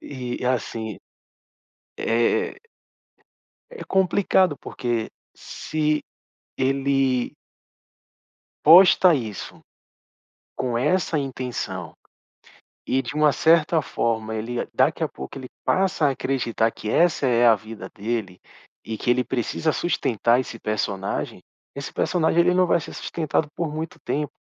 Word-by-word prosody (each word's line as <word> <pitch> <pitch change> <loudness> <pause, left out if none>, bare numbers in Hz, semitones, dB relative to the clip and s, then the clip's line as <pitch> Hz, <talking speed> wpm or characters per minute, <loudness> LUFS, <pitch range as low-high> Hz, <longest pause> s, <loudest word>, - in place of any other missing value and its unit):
E 125 -3 -6
e - - -2
assim, 115 -4 -2 1.0
eh 115 +1 +1 1.2
É 475 - -8
complicado, 190 -3 +2
porque 120 -3 -3 0.2
se 155 -1 -2 0.5
ele 135 -1 +1 1.3
posta 180 +2 +8
isso, 110 -8 -5 1.0
com 120 -2 -1
essa 160 +5 +1
intenção 130 -3 -4 0.9
e, 135 - +1
de 125 - -6
uma 150 -1 +4
certa 160 +2 +3
forma, 110 -4 -2
ele 115 +2 -3
daqui - - +2
a - - -1
pouco, 65 - -9
ele 130 -1 -8 0.2
passa 185 -5 +2
a 140 - +4
acreditar 120 -4 0
que 105 - -7
essa 165 +1 +3
é 120 -1 +3
a 115 - +8
vida 105 -2 -9
dele 105 -3 -4 0.4
e 110 -1 -5
que - - -3
ele 125 0 +3
precisa 135 +6 -1
sustentar 120 - +1
esse 125 -3 -5
personagem. 100 -3 -3 0.3
Esse 140 0 -6
personagem 170 -1 +1
ele 180 +1 +4
não 185 0 +4
vai 170 - +2
ser - - -9
sustentado 155 -2 -2
por 170 - -1
muito 155 +1 -6
tempo. 150 0 -2
130 Hz, 125 wpm, -23 LUFS, 115-155 Hz, 1.3 s, posta